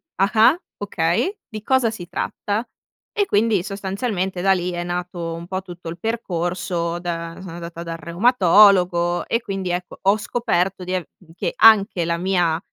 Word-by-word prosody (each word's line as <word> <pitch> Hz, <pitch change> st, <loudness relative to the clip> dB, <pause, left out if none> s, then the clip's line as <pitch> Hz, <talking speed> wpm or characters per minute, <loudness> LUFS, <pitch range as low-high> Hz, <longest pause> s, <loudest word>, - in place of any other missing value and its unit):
ah-ah, 220 Hz, -, +4 dB, 0.2 s
okay, 205 Hz, -, -1 dB
di 215 Hz, -1 st, -7 dB
cosa 260 Hz, -2 st, +2 dB
si 180 Hz, -6 st, -8 dB
tratta? 210 Hz, +4 st, -3 dB, 0.5 s
E 410 Hz, -2 st, +2 dB
quindi 210 Hz, -, +2 dB
sostanzialmente 195 Hz, -1 st, -3 dB
da 195 Hz, +1 st, +4 dB
lì 180 Hz, -1 st, -2 dB
è 175 Hz, 0 st, -3 dB
nato 175 Hz, -1 st, -4 dB
un 170 Hz, +1 st, -8 dB
po' 185 Hz, +1 st, -3 dB
tutto 175 Hz, -2 st, -11 dB
il 170 Hz, +1 st, -8 dB
percorso, 175 Hz, -5 st, -2 dB
da 170 Hz, -1 st, -4 dB
sono 185 Hz, -2 st, -8 dB
andata 170 Hz, 0 st, -7 dB
dal 165 Hz, -1 st, -5 dB
reumatologo 180 Hz, -2 st, +4 dB
e 230 Hz, -, 0 dB
quindi 195 Hz, -4 st, -4 dB
ecco, 180 Hz, 0 st, -4 dB
ho 195 Hz, +2 st, +3 dB
scoperto 195 Hz, -4 st, -1 dB
di 185 Hz, +1 st, -2 dB
av 180 Hz, -3 st, -2 dB, 0.3 s
che -, -, -2 dB
anche 200 Hz, -5 st, +5 dB
la 170 Hz, 0 st, 0 dB
mia 175 Hz, -3 st, +1 dB
185 Hz, 160 wpm, -21 LUFS, 175-210 Hz, 0.5 s, anche